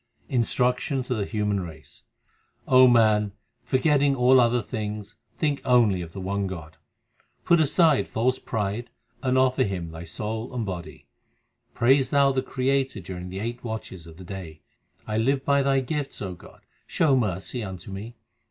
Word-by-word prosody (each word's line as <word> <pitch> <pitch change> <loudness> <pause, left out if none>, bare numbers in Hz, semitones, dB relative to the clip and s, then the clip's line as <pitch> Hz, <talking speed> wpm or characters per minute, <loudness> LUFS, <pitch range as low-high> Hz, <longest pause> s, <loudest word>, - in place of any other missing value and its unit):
Instruction 125 +2 +1
to 125 - -2
the 105 -4 -1
human 105 -1 -1
race: 80 -4 -10 0.6
man, 115 -5 +5 0.3
forgetting 140 +1 +2
all 130 +1 +5
other 120 0 +3
things, 105 -2 -5 0.2
think 145 -3 0
only 115 -7 +3
of 85 -1 -7
the 95 - -8
one 100 +1 -2
God; 80 -5 -8 0.7
Put 170 - +5
aside 155 -1 +3
false 125 +3 0
pride 110 +1 -3 0.3
and 130 0 +1
offer 130 0 +3
Him 90 -6 -4
thy 80 +1 -8
soul 110 +8 -5
and 115 -3 -2
body; 90 -4 -7 0.7
Praise 130 +2 +4
thou 140 -1 +4
the 130 -1 0
Creator 130 -3 -1
during 90 0 -7
the 95 - -6
eight 120 +2 -5
watches 110 -7 -6
of 80 -1 -13
the 95 - -10
day. 85 -4 -8 0.4
1 110 +1 0
live 135 +2 +1
by 140 0 +3
Thy 135 -1 +2
gifts, 145 +1 -4
O 95 -3 -4
God, 90 - -16 0.3
show 150 -5 +2
mercy 110 +1 -1
unto 95 -2 -7
me. 105 +5 -7
115 Hz, 160 wpm, -25 LUFS, 95-130 Hz, 0.7 s, man